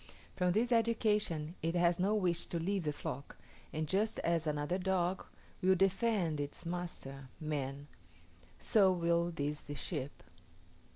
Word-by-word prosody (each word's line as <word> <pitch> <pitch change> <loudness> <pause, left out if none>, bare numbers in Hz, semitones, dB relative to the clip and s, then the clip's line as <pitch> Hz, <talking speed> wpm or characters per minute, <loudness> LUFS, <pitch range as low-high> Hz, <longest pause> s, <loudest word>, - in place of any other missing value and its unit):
From 180 -1 +2
this 235 +5 +1
education 210 -8 +2
it 165 +2 -1
has 175 0 +3
no 200 +4 +2
wish 180 -5 +1
to 170 - -2
leave 185 +1 -1
the 150 - +1
flock, 140 -1 -6 0.3
and 155 0 -2
just 210 +6 +1
as 165 -1 +1
another 150 +4 0
dog 185 -1 0 0.3
will 190 +1 +5
defend 195 -4 +2
its 145 +4 -5
master, 165 -6 -5
man, 145 -2 -3 0.7
so 200 -5 +4
will 170 -1 +2
these 150 -2 -3
the 145 - -7
sheep. 135 +1 -4
170 Hz, 140 wpm, -34 LUFS, 150-190 Hz, 0.7 s, will